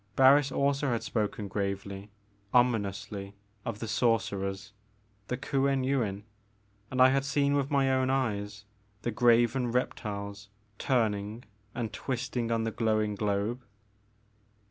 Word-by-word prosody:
Barris 135 Hz, +1 st, +6 dB
also 140 Hz, +1 st, +1 dB
had 115 Hz, -2 st, -1 dB
spoken 105 Hz, -2 st, -2 dB
gravely, 100 Hz, 0 st, -4 dB, 0.5 s
ominously 100 Hz, -4 st, 0 dB, 0.3 s
of 115 Hz, -3 st, -4 dB
the 115 Hz, -, -5 dB
sorcerers, 100 Hz, -4 st, 0 dB, 0.5 s
the 125 Hz, -, -2 dB
Kuen 135 Hz, 0 st, +1 dB
Yuin, 115 Hz, -7 st, 0 dB, 0.7 s
and 130 Hz, -, -3 dB
I 130 Hz, 0 st, +8 dB
had 135 Hz, +1 st, +2 dB
seen 140 Hz, 0 st, +1 dB
with 140 Hz, -1 st, +1 dB
my 135 Hz, -2 st, +2 dB
own 130 Hz, 0 st, +2 dB
eyes 105 Hz, -6 st, -1 dB, 0.4 s
the 120 Hz, -, -1 dB
graven 120 Hz, +1 st, +3 dB
reptiles 100 Hz, -4 st, -3 dB, 0.3 s
turning 110 Hz, -3 st, 0 dB, 0.3 s
and 115 Hz, -3 st, -3 dB
twisting 125 Hz, -2 st, -3 dB
on 115 Hz, -1 st, +1 dB
the 115 Hz, -, -1 dB
glowing 110 Hz, -2 st, +1 dB
globe. 105 Hz, +4 st, -1 dB
115 Hz, 120 wpm, -29 LUFS, 105-130 Hz, 0.7 s, I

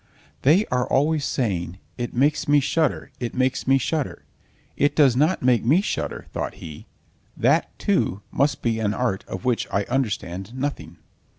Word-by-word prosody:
"They 170 Hz, +10 st, +4 dB
are 125 Hz, 0 st, +1 dB
always 150 Hz, +2 st, +2 dB
saying: 95 Hz, -7 st, -2 dB, 0.2 s
'It 120 Hz, -1 st, -4 dB
makes 140 Hz, +4 st, +1 dB
me 145 Hz, 0 st, +5 dB
shudder, 145 Hz, 0 st, 0 dB
it 120 Hz, -2 st, -4 dB
makes 130 Hz, 0 st, 0 dB
me 135 Hz, +1 st, +5 dB
shudder!' 145 Hz, +2 st, -2 dB, 0.5 s
It 145 Hz, +1 st, +1 dB
does 140 Hz, -6 st, +5 dB
not 155 Hz, +6 st, +2 dB
make 125 Hz, -3 st, +3 dB
me 145 Hz, +10 st, +4 dB
shudder," -, -, -3 dB
thought -, -, -3 dB
he. 75 Hz, -2 st, -10 dB, 0.5 s
"That, -, -, +2 dB
too, 100 Hz, +2 st, 0 dB
must 145 Hz, +1 st, 0 dB
be 115 Hz, -2 st, 0 dB
an 105 Hz, -1 st, 0 dB
art 120 Hz, -6 st, -1 dB
of 95 Hz, -, -6 dB
which 125 Hz, -2 st, +1 dB
I 100 Hz, -, +1 dB
understand 100 Hz, -4 st, -3 dB
nothing!" 140 Hz, +2 st, -4 dB
130 Hz, 165 wpm, -23 LUFS, 110-145 Hz, 0.5 s, me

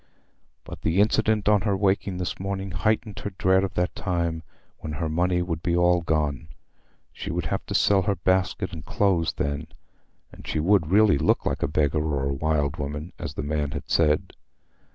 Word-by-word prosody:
But -, -, -10 dB
the 80 Hz, +5 st, +1 dB
incident 105 Hz, 0 st, +2 dB
on 105 Hz, -1 st, +4 dB
her 100 Hz, -2 st, 0 dB
waking 95 Hz, -1 st, 0 dB
this 90 Hz, -1 st, -4 dB
morning 95 Hz, 0 st, -4 dB
heightened 105 Hz, +5 st, -1 dB
her 100 Hz, -, -4 dB
dread 95 Hz, +1 st, +3 dB
of 95 Hz, -3 st, -3 dB
that 90 Hz, 0 st, 0 dB
time 85 Hz, -4 st, -2 dB, 0.4 s
when 75 Hz, -, -6 dB
her 80 Hz, +2 st, -2 dB
money 90 Hz, +3 st, +1 dB
would 85 Hz, -3 st, -3 dB
be 85 Hz, 0 st, 0 dB
all 90 Hz, 0 st, +3 dB
gone; 75 Hz, -2 st, -1 dB, 0.7 s
she -, -, -6 dB
would -, -, -2 dB
have -, -, -2 dB
to -, -, -3 dB
sell 100 Hz, -1 st, +4 dB
her 100 Hz, +2 st, 0 dB
basket 95 Hz, +1 st, 0 dB
and 80 Hz, -3 st, -7 dB
clothes 90 Hz, -2 st, +1 dB
then, 70 Hz, +2 st, -3 dB, 0.6 s
and -, -, -13 dB
she -, -, -1 dB
would 85 Hz, -1 st, +3 dB
really 100 Hz, -4 st, +5 dB
look -, -, +2 dB
like -, -, -1 dB
a -, -, +1 dB
beggar 75 Hz, +1 st, +1 dB
or 75 Hz, -3 st, -1 dB
a 70 Hz, 0 st, 0 dB
wild 75 Hz, 0 st, 0 dB
woman, 75 Hz, +3 st, -5 dB
as -, -, -5 dB
the -, -, -3 dB
man 75 Hz, 0 st, -1 dB
had 70 Hz, 0 st, -6 dB
said. 75 Hz, -2 st, +2 dB
85 Hz, 195 wpm, -25 LUFS, 75-95 Hz, 0.7 s, really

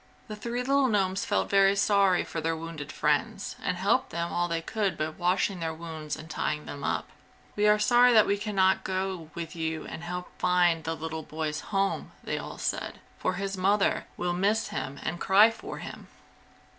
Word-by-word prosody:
The 215 Hz, -, -6 dB
three 235 Hz, +3 st, -3 dB
little 275 Hz, +1 st, +3 dB
gnomes 195 Hz, -4 st, +1 dB
felt -, -, +1 dB
very 195 Hz, 0 st, +5 dB
sorry 200 Hz, -2 st, +3 dB
for 165 Hz, -, -5 dB
their 165 Hz, +1 st, 0 dB
wounded 160 Hz, -3 st, -7 dB
friends -, -, 0 dB
and -, -, -1 dB
helped -, -, +2 dB
them 170 Hz, +1 st, -3 dB
all 175 Hz, 0 st, +1 dB
they 165 Hz, -1 st, -1 dB
could 200 Hz, -3 st, -1 dB
by 155 Hz, 0 st, -1 dB
washing 180 Hz, +3 st, 0 dB
their 160 Hz, -1 st, -3 dB
wounds 160 Hz, -2 st, -5 dB
and 155 Hz, -, -10 dB
tying 150 Hz, -2 st, -2 dB
them 140 Hz, -1 st, -7 dB
up. -, -, -1 dB, 0.5 s
"We 210 Hz, 0 st, +3 dB
are 210 Hz, 0 st, +6 dB
sorry 245 Hz, +3 st, +5 dB
that 220 Hz, -3 st, +7 dB
we 200 Hz, 0 st, 0 dB
can 210 Hz, 0 st, -4 dB
not 190 Hz, 0 st, +3 dB
go 185 Hz, -3 st, -3 dB
with 170 Hz, 0 st, -6 dB
you 160 Hz, -1 st, -3 dB
and 165 Hz, -, -7 dB
help 180 Hz, +1 st, -5 dB
find 175 Hz, -2 st, +3 dB
the 165 Hz, 0 st, -1 dB
little 160 Hz, +1 st, -5 dB
boy's 155 Hz, -1 st, -3 dB
home," 195 Hz, -1 st, -1 dB
they -, -, -2 dB
all -, -, -7 dB
said, -, -, -2 dB, 0.2 s
"For -, -, 0 dB
his 195 Hz, +1 st, -3 dB
mother 195 Hz, +2 st, +2 dB
will 175 Hz, 0 st, -1 dB
miss 205 Hz, +5 st, +1 dB
him 135 Hz, +1 st, -4 dB
and 175 Hz, +1 st, -3 dB
cry 210 Hz, +4 st, +6 dB
for 225 Hz, -, -8 dB
him. -, -, -8 dB
180 Hz, 195 wpm, -28 LUFS, 160-200 Hz, 0.5 s, that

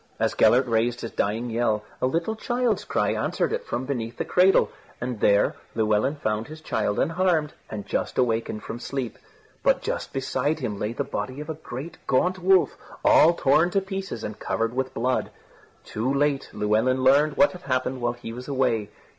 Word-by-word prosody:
As -, -, +1 dB
Gellert 125 Hz, +2 st, +5 dB
raised 120 Hz, +1 st, 0 dB
his 115 Hz, -, -5 dB
dying 115 Hz, +4 st, -1 dB
yell, 110 Hz, -2 st, +1 dB, 0.2 s
a -, -, +3 dB
little 165 Hz, +10 st, -1 dB
child's 240 Hz, -1 st, 0 dB
cry -, -, +1 dB
answered -, -, -1 dB
it -, -, -3 dB
from 120 Hz, +2 st, -2 dB
beneath 120 Hz, -4 st, -4 dB
the -, -, -2 dB
cradle, 185 Hz, +2 st, +4 dB, 0.3 s
and 120 Hz, -2 st, -4 dB
there 100 Hz, 0 st, +3 dB, 0.2 s
Llewelyn 110 Hz, +5 st, +2 dB
found 110 Hz, -5 st, -2 dB
his 155 Hz, +1 st, -9 dB
child 105 Hz, -9 st, -1 dB
unharmed 165 Hz, -3 st, +1 dB, 0.2 s
and 105 Hz, -2 st, -6 dB
just -, -, -2 dB
awakened 115 Hz, -3 st, 0 dB
from 115 Hz, -, -6 dB
sleep. 130 Hz, -2 st, -4 dB, 0.4 s
But -, -, +2 dB
just -, -, -3 dB
beside 135 Hz, +3 st, -1 dB
him 110 Hz, -8 st, -4 dB
lay 105 Hz, +2 st, -2 dB
the -, -, -2 dB
body 130 Hz, +2 st, -4 dB
of 150 Hz, +2 st, -5 dB
a 155 Hz, 0 st, -9 dB
great 135 Hz, +7 st, -7 dB
gaunt 180 Hz, +8 st, +2 dB
wolf 185 Hz, 0 st, +4 dB, 0.3 s
all 170 Hz, +2 st, +6 dB
torn 155 Hz, +5 st, +3 dB
to 195 Hz, -, +2 dB
pieces 190 Hz, -, -5 dB
and 105 Hz, -, -6 dB
covered 115 Hz, +1 st, -1 dB
with 130 Hz, +1 st, -1 dB
blood. 125 Hz, +2 st, 0 dB, 0.6 s
Too 115 Hz, +5 st, -2 dB
late, 140 Hz, 0 st, +1 dB
Llewelyn 110 Hz, +5 st, +1 dB
learned 140 Hz, +3 st, +4 dB
what 190 Hz, -, +5 dB
had 180 Hz, -, -10 dB
happened 130 Hz, -2 st, -1 dB
while 120 Hz, 0 st, 0 dB
he 120 Hz, -2 st, -8 dB
was 125 Hz, +2 st, -8 dB
away. 125 Hz, -7 st, 0 dB
130 Hz, 185 wpm, -25 LUFS, 115-155 Hz, 0.6 s, all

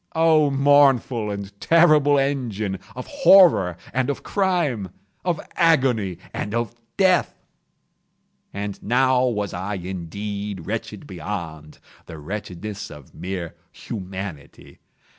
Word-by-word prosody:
—oh, 160 Hz, -2 st, +4 dB
mournful 135 Hz, -5 st, +3 dB
and 100 Hz, 0 st, -6 dB
terrible 155 Hz, -4 st, +5 dB
engine 115 Hz, -8 st, -1 dB, 0.2 s
of 125 Hz, -, -6 dB
Horror 180 Hz, -, +5 dB, 0.2 s
and 130 Hz, +1 st, 0 dB
of 140 Hz, -, -3 dB
Crime—of 155 Hz, -, -2 dB, 0.2 s
Agony 130 Hz, -, +2 dB, 0.2 s
and 105 Hz, +2 st, -3 dB
of 120 Hz, -1 st, -2 dB, 0.2 s
Death! 185 Hz, -2 st, +3 dB, 1.2 s
And 100 Hz, 0 st, -5 dB
now 130 Hz, +2 st, +2 dB
was 105 Hz, -5 st, -2 dB
I 95 Hz, +4 st, -3 dB
indeed 95 Hz, +1 st, -5 dB
wretched -, -, -5 dB
beyond 80 Hz, -3 st, -7 dB, 0.3 s
the 80 Hz, -, -9 dB
wretchedness 100 Hz, +4 st, -6 dB
of 75 Hz, -3 st, -13 dB
mere 90 Hz, -3 st, -5 dB, 0.2 s
Humanity. 95 Hz, -7 st, -8 dB
105 Hz, 105 wpm, -23 LUFS, 95-140 Hz, 1.2 s, terrible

